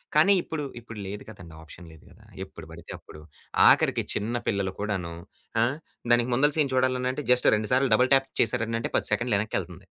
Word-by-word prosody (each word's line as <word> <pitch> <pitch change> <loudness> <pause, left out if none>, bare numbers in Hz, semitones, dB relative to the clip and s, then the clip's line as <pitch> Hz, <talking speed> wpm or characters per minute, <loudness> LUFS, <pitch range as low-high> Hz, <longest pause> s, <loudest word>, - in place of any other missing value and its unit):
కానీ 160 +7 +6
ఇప్పుడు, 160 -3 -5 0.2
ఇప్పుడు 115 -2 -10
లేదు 100 +1 -6
కదండీ! 90 -6 -12
ఆప్షన్ 80 +2 -13
లేదు 80 - -17
గదా! - - -20 0.2
ఎప్పుడు - - -11
బడితే - - -11
అప్పుడు 75 - -14 0.5
ఆఖరికి - - +4
చిన్న 115 +4 -2
పిల్లలు 100 -3 -1
కూడాను. 95 -5 -3 0.5
ఆ! - - +5 0.5
దానికి 120 +1 +3
ముందల 145 +4 +3
సీన్ 145 -3 +1
చూడాలనంటే 130 +2 0
జస్ట్ 125 - +4
2 105 0 -2
సార్లు 130 -2 +2
డబుల్ 125 +4 +2
ట్యాప్ 135 0 +3
చేసారనంటే 115 0 -1
10 - - -1
సెకండ్లెనక్కెళ్తుంది. 110 -3 -2
115 Hz, 170 wpm, -26 LUFS, 100-130 Hz, 0.5 s, కానీ